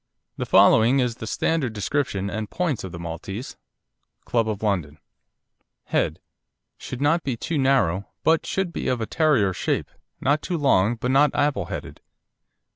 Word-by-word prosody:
The - - -3
following 120 +5 +5
is 125 -3 0
the 110 - -7
standard 140 -2 0
description 105 -2 -1
and 105 +1 -4
points 170 - -2
of 95 - -6
the 85 - -7
Maltese 85 - -6 0.7
Club 115 -2 +1
of 105 0 -4
London: 85 -8 -1 0.9
HEAD - - 0 0.6
Should 125 - -7
not 155 +4 +3
be 130 -5 -3
too 160 +5 -2
narrow, 125 -9 +2 0.2
but 160 0 +3
should 190 -3 -1
be - - -3
of 125 - 0
a 110 - -2
Terrier 135 - +2
shape, - - -2 0.3
not 145 +3 +1
too 175 - -2
long, 120 -7 +3
but 125 +2 -2
not 145 +2 +5
apple 140 -11 +1
headed. - - -7
120 Hz, 160 wpm, -24 LUFS, 100-145 Hz, 0.9 s, following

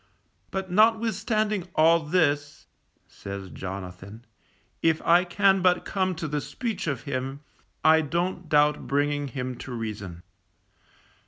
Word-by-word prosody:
But 190 -1 -4
notwithstanding 215 -1 +2
all 165 +2 +5
this, 150 -3 0 0.4
says 100 -1 -8
Jonathan, 95 +4 -8 0.6
_if 165 -1 +3
I 175 +2 +5
can 195 +2 +3
but 180 -1 +3
come 185 -2 -1
to 160 0 -4
the 150 0 -2
speech 225 - -4
of 140 -5 -2
him, 135 0 -4 0.4
I 160 0 +6
don't 170 +2 -2
doubt 150 0 +3
bringing 145 0 0
him 130 -1 -4
to 135 - -8
reason. 105 -7 -6
155 Hz, 120 wpm, -26 LUFS, 130-185 Hz, 0.6 s, I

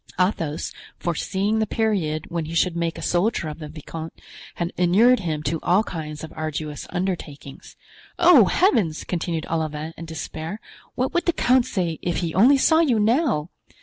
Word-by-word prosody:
Athos, 165 -5 -1 0.2
foreseeing 195 +5 -1
the 220 - +1
period 185 -10 0
when 170 -2 -2
he 165 +2 -6
should 170 0 +2
make 170 -1 -2
a - - -7
soldier 180 -1 +1
of 150 - -8
the 155 - -7
viscount, 160 +1 -8 0.4
had 170 0 -3
inured 210 +8 +4
him 155 -5 -3
to 155 +2 -1
all 190 +5 +3
kinds 155 -6 -6
of 160 - -8
arduous 155 -1 -4
undertakings. 170 -7 -5 0.4
"Oh, 290 - +7
heavens!" 210 - +2
continued 170 -2 -3
Olivain, 155 -1 -3
in 165 - -7
despair, 160 +3 -6 0.4
"what 255 +1 -1
would 345 0 0
the 345 - +3
count 255 -3 +3
say 175 -8 -2
if 175 -1 -1
he 165 -2 -2
only 250 +9 +6
saw 320 +4 +4
you 265 -9 +3
now!" 220 - +1
170 Hz, 170 wpm, -23 LUFS, 155-220 Hz, 0.4 s, Oh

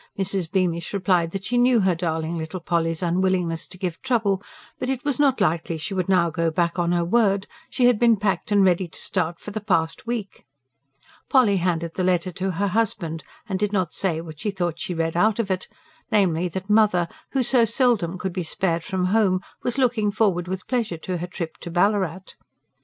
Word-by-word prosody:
Mrs. 190 -3 -1
Beamish 175 -2 0
replied 180 -4 +2
that 195 +2 -5
she 245 +2 +1
knew 245 -2 +4
her 190 -1 +3
darling 165 -1 -2
little 160 +3 -4
Polly's 165 0 -1
unwillingness 175 -1 0
to 185 - -12
give 180 -3 -4
trouble; 220 -7 +1 0.4
but 255 - -2
it 265 -1 -2
was 285 -3 0
not 275 -3 +3
likely 165 0 0
she 160 +6 -4
would 185 -1 -1
now 175 -3 +3
go 165 +1 0
back 170 +2 0
on 170 0 +1
her 175 -1 +1
word: 200 0 +2 0.2
she 250 - +1
had 245 -3 +4
been 235 -2 +5
packed 195 -1 -1
and 200 -1 +5
ready 180 0 +2
to - - -11
start 170 +1 -2
for 210 - -8
the 215 +1 -4
past 165 -2 0
week. 230 -4 -4 0.9
Polly 235 -7 +4
handed 170 -2 -1
the 185 - -2
letter 180 0 +1
to 190 +2 -3
her 195 +3 -1
husband, 175 -7 -1 0.2
and 190 -3 -2
did 210 0 0
not 185 -5 0
say 170 -5 -1
what 160 -2 -10
she 210 - -2
thought 175 -4 -2
she 180 - -4
read 165 0 -1
out 210 +4 +3
of 215 -4 -1
it, 185 -1 -2 0.4
namely 180 -5 +2
that 190 +2 -6
"mother," 210 -5 +3 0.3
who 265 -2 +2
so 245 0 +4
seldom 230 -7 +1
could 185 0 -4
be 185 - -2
spared 170 0 -1
from 185 +1 -1
home, 200 -5 +3 0.2
was 245 - -2
looking 240 -5 +2
forward 195 -4 +1
with 185 0 -4
pleasure 230 -9 -1
to 180 +3 -4
her 175 +1 -4
trip 170 -2 -6
to - - -8
Ballarat. 190 0 +1
185 Hz, 210 wpm, -23 LUFS, 170-210 Hz, 0.9 s, been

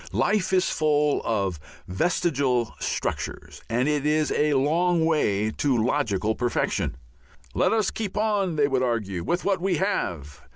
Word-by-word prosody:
Life 205 -3 +1
is 185 -1 +3
full 150 -1 +1
of 100 -7 -1 0.3
vestigial 130 - 0
structures, - - -4
and 125 +4 +1
it 150 -2 0
is 150 0 +1
a 150 -1 +2
long 165 +5 +2
way 110 -10 +1
to 135 +2 0
logical 110 -4 0
perfection. 120 +1 -1 0.6
Let - - +2
us 220 -3 +1
keep 205 -3 -5
on, 205 -5 +1
they 145 -2 +3
would 135 -2 0
argue, 105 -8 -1
with 175 - -1
what 195 -3 +1
we 190 0 +1
have. 75 - -2
145 Hz, 150 wpm, -25 LUFS, 115-175 Hz, 0.6 s, is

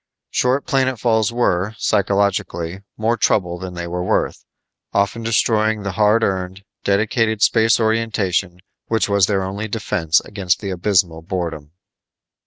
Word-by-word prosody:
Short 130 +3 +1
planetfalls 120 -5 +1
were, 110 -4 0
psychologically, 100 -3 0 0.2
more 115 +2 +1
trouble 90 -6 +1
than 90 -1 -7
they 85 0 -4
were 90 +1 -3
worth, - - -1 0.5
often 100 +3 0
destroying 110 -2 +1
the 100 - -2
hard 110 +2 +3
earned, 95 0 -2 0.2
delicate 110 +2 +1
space 115 0 +4
orientation 105 -5 0 0.3
which 115 0 +1
was 100 -2 +3
their 100 -2 0
only 100 +3 -4
defense 95 -7 +1
against 95 -3 -1
the 100 -2 -4
abysmal 90 -3 +1
boredom. 80 -4 -5
100 Hz, 130 wpm, -20 LUFS, 90-110 Hz, 0.5 s, space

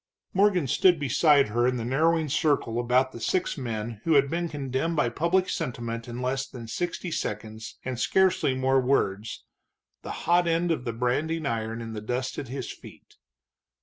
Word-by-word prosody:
Morgan 190 -4 +3
stood 175 +6 +4
beside 145 -1 +4
her 120 +3 +2
in 125 0 0
the 115 - -3
narrowing 160 +5 +2
circle 140 -5 +1
about 125 +2 +2
the 115 - -9
six 180 +9 0
men 115 -4 -4
who 165 -2 +3
had 140 -1 +4
been 170 0 -1
condemned 140 +3 -2
by 150 -6 +2
public 170 +8 +1
sentiment 115 -1 -4
in 120 +1 -5
less 135 +1 -1
than 120 -3 -9
sixty 175 +8 -3
seconds 110 -7 -5
and 130 -2 -3
scarcely 185 -5 +2
more 130 0 +2
words, 115 -5 0 0.6
the - - -8 0.2
hot 175 0 +4
end 170 +1 +1
of 135 -6 -2
the 115 - -2
branding 145 +7 -1
iron 115 -2 -2
in 115 -1 -6
the 105 - -5
dust 125 +4 -3
at 140 - -6
his 135 +3 -5
feet. - - -15
130 Hz, 180 wpm, -27 LUFS, 120-160 Hz, 0.6 s, stood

